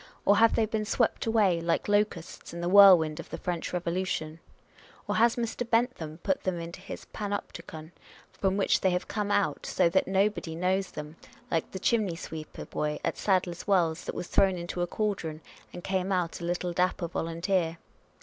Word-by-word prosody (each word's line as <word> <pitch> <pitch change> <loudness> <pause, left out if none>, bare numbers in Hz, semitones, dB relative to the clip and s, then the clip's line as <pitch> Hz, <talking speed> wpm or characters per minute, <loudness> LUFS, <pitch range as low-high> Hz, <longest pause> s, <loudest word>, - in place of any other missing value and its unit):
Or 205 - +5
have 230 +1 +5
they 225 - +3
been 215 0 -2
swept 225 +2 0
away, 205 -7 +3
like 170 0 0
locusts, 205 -6 -1
in 170 - -5
the 175 - -1
whirlwind 180 -6 +7
of - - -8
the - - -5
French 175 -2 -3
Eevolution? 170 -2 -2 0.7
Or - - 0
has 230 +1 +4
Mr. 235 0 -3
Bentham 230 -10 0
put 190 -2 0
them 185 -2 -2
into 170 +1 -7
his 195 - -8
Panopticon; 170 -6 -5 0.4
from 195 0 0
which 200 - +2
they 190 - +3
have 180 0 -1
come 210 -1 -2
out, 205 -1 0
so 180 -2 +2
that 190 +3 +2
nobody 190 -3 0
knows 185 +2 0
them, 150 +1 -8 0.3
like 165 - 0
the - - -6
chimney 205 -3 +1
sweeper 160 -2 -8
boy 150 0 -2
at - - -1
Sadler's 185 -3 0
Wells, 170 -5 +2
that - - -4
was - - -4
thrown 190 +1 +3
into 175 +1 -4
a 175 - 0
cauldron 175 -6 -2 0.3
and 175 - -9
came 190 0 -1
out 180 -2 -1
a - - -4
little 175 0 -2
dapper 180 0 0
volunteer 165 +1 -1
180 Hz, 185 wpm, -28 LUFS, 170-200 Hz, 0.7 s, whirlwind